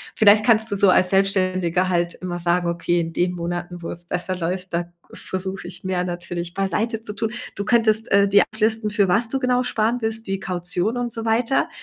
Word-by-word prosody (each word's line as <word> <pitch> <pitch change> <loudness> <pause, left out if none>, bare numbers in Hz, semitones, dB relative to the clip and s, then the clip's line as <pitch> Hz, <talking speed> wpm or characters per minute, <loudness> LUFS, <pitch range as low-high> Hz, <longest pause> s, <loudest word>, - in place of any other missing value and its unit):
Vielleicht 215 0 +5
kannst 220 -1 +4
du - - 0
so 200 -1 +4
als 180 0 +4
Selbstständiger 185 -2 +1
halt 175 -1 0
immer 175 -1 -5
sagen: 175 0 +1
„Okay, 175 0 0
in 165 0 -3
den 180 0 0
Monaten, 175 +1 -5
wo 165 - -6
es 175 - -8
besser 180 +1 -2
läuft, 180 +1 -4
da 175 0 -2 0.2
versuche 190 0 -6
ich 180 +1 -10
mehr 180 -1 -1
natürlich 175 -1 -5
beiseite 210 +4 -1
zu 210 - -6
tun.“ 220 +1 -2 0.2
Du 200 - -3
könntest, 225 -1 +2
äh, 200 0 +5
dir 200 +1 +5
ablisten, 220 0 +1
für 205 -2 +2
was 225 +6 +3
du 270 - 0
genau 250 -1 +1
sparen 235 0 0
willst, 225 -1 -3
wie 195 0 -2
Kaution 180 +5 0
und 240 -2 -1
so 225 - -3
weiter, 230 +4 +1
190 Hz, 210 wpm, -22 LUFS, 175-220 Hz, 0.2 s, Vielleicht